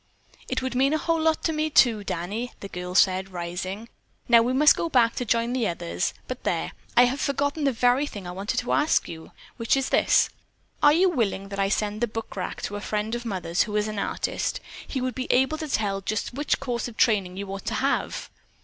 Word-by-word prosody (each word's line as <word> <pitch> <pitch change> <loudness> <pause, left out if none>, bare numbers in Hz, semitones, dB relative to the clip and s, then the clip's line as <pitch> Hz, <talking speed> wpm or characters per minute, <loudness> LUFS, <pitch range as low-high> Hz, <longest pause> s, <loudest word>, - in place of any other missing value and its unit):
"It 260 0 -1
would 260 -1 -2
mean 270 +3 +2
a - - +3
whole 330 +1 0
lot 320 0 +1
to 320 - +1
me, 310 0 0
too, 230 -7 +4
Danny," 205 +8 -4
the 200 - -7
girl 180 -1 -6
said, 190 0 +3
rising. 185 +5 -5 0.4
"Now 235 -1 +7
we 240 +2 0
must 290 +3 +6
go 335 - -2
back 235 -5 +4
to 250 - -1
join 235 +2 +1
the 245 -4 +1
others, 85 - -2
but - - -6
there, - - -1 0.3
I 245 - +9
have 265 +4 -1
forgotten 285 +2 0
the 275 - +3
very 250 +4 +2
thing 205 -8 -8
that 175 - -7
I - - -6
wanted 205 +7 -2
to 245 - -4
ask 300 - +2
you, 160 -1 -9 0.3
which 230 +2 +2
is 270 - -1
this: - - +3 0.5
Are 290 -1 +7
you 350 +5 +4
willing 210 - -1
that 200 0 -5
I 195 0 +2
send 210 +1 -1
the 240 - +2
bookrack 215 -4 -5
to 205 - -3
a - - -7
friend 210 +1 -2
of 240 0 -3
Mother's 180 -5 -1
who 210 -1 -5
is 210 0 +1
an 215 -1 -4
artist? - - -2 0.3
He 265 - -3
would 255 0 -1
be 255 - -2
able 265 +5 +2
to 310 - -4
tell 200 -7 -1
just 215 +4 -3
which 290 +3 0
course 245 -3 -2
of 235 - -11
training 195 -6 +2
you 200 0 -5
ought 195 - -7
to - - -2
have." - - -1
230 Hz, 230 wpm, -25 LUFS, 195-265 Hz, 0.5 s, I